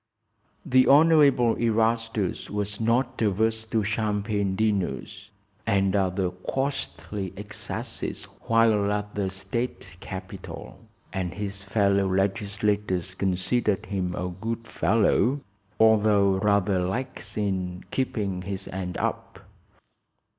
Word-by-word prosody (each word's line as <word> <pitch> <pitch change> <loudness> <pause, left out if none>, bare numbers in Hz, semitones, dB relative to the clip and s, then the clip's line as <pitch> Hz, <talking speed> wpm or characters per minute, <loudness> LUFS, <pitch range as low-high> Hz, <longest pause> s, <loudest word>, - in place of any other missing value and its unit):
The 130 0 +4
Honorable 140 -6 +6
Erastus 115 -3 0
was 105 0 -3
not 120 +3 +1
averse 110 +2 +1
to 110 -1 +1
champagne 105 -2 0
dinners 100 -9 -1 0.4
and 100 -2 +2
other 95 -1 +1
costly 105 -2 -3
excesses 105 +1 -5 0.2
while 110 -3 +4
at 105 0 -2
the 100 -2 -1
state 100 +6 -4
capital, - - -8 0.3
and 90 -2 -3
his 100 -1 -4
fellow 100 -1 +2
legislators 100 -1 0
considered 100 +3 0
him 95 -3 -2
a 90 0 -2
good 115 +5 -5
fellow, 115 +5 +2 0.4
although 105 -3 +4
rather 100 -2 +2
lax 105 +3 -3
in 95 -3 -2
"keeping 105 -8 -1
his 95 +1 -5
end 90 -1 -4
up." - - -4
105 Hz, 105 wpm, -26 LUFS, 95-115 Hz, 0.4 s, Honorable